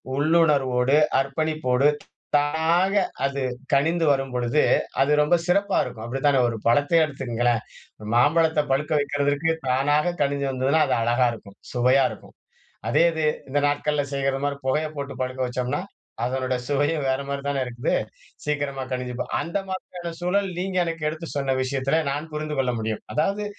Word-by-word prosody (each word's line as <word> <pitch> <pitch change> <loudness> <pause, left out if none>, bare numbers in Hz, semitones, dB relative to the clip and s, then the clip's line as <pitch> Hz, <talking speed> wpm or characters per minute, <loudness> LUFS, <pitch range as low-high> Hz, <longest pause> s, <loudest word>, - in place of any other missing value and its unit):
உள்ளுணர்வோடு, 140 -4 +3 0.2
அர்ப்பணிப்போடு, 140 -1 +1 0.5
தானாக 165 +6 +1 0.3
அது 140 0 -2 0.3
கனிந்து 165 +4 +2
வரும்பொழுது, 135 0 +1 0.4
அது 135 - +3
ரொம்ப 150 +4 +4
சிறப்பா 200 +2 +2
இருக்கும். 120 -3 -7
அப்டி 130 +3 -4
தானே 140 -2 +4
ஒரு 115 - -4
பழத்த 145 +7 +3
எடுத்துக்கங்களேன் 120 -5 -1 0.5
மாம்பழத்த 160 +4 +4
பழுக்க 150 +4 0
வெக்கிறதுக்கு 145 +2 0 0.2
தானாக 145 +6 +2
கனிஞ்சி 140 0 0
வந்ததுனா, 135 +4 +2
அது - - +1
அழகா 120 +2 +3
இருக்கும். 100 -3 -13 0.2
சுவையா 130 +2 +4
இருக்கும். - - -13 0.5
அதே 165 - +4
இது 160 -1 -1 0.2
இந்த 145 - 0
நாட்கள்ல 145 0 0
செய்வது 135 0 0
மாதிரி 145 -1 -1
புகையை 155 +4 +1
போட்டு 140 -1 -4
பழுக்க 130 0 -4
வச்சோம்னா, 125 +6 -2 0.4
அதனுடைய 130 0 -1
சுவையும் 145 +1 0
வேற 130 +1 +1
மாதிரி 140 0 -3
தானே 140 -1 0
இருக்குது 120 0 -2 0.5
சீக்கிரமா 145 -2 -2
கனிஞ்சி, 125 -1 -3
ப - - 0 0.2
அந்த 170 +4 -2
மாதிரியான 180 -2 -6
சூழல் 195 +2 +1
நீங்க 185 +1 -3
எனக்கு 165 -2 -3
எடுத்து 160 +2 -5
சொன்ன 135 -2 0
விஷயத்துல 135 +4 0
நான் 150 +3 -4
புரிந்து 150 -1 -3
கொள்ள 130 -2 +1
முடியும். 110 -1 -3
அதாவது, 200 +7 0
140 Hz, 150 wpm, -24 LUFS, 130-155 Hz, 0.5 s, ரொம்ப